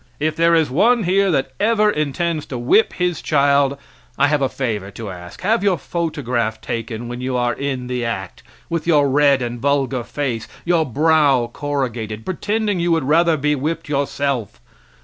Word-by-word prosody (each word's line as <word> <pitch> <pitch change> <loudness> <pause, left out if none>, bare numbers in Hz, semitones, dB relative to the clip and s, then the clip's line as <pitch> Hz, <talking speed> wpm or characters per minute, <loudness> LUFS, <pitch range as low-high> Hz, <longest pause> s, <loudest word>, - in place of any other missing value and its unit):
If 155 +1 0
there 170 0 +4
is 160 -5 +2
one 230 - +3
here 195 +2 +2
that 135 -5 0
ever 215 0 +3
intends 155 +1 -2
to 130 - -5
whip 125 - +3
his 180 -2 -1
child 140 -1 +2 0.4
I 140 +1 +3
have 150 -1 +1
a 135 - +1
favor 110 -8 -3
to 100 0 -7
ask. 90 +1 -10
Have 215 +4 +1
your 195 -3 +2
photograph 130 -10 -2
taken 115 +1 -5
when 120 +1 -6
you 130 0 -1
are 120 0 +1
in 135 -3 -3
the 125 -1 -3
act, 100 -5 -4 0.3
with 170 -1 -3
your 150 -4 +4
red 140 -1 +3
and 120 0 -4
vulgar 135 -2 0
face, 120 -5 -3 0.2
your 170 -2 +2
brow 140 -3 +3
corrugated, 120 -7 -3
pretending 205 +1 -1
you 170 0 +1
would 165 -3 +2
rather 160 +3 +3
be 150 +1 +1
whipped 150 +4 -3
yourself. 140 -5 -2
140 Hz, 175 wpm, -20 LUFS, 125-165 Hz, 0.4 s, there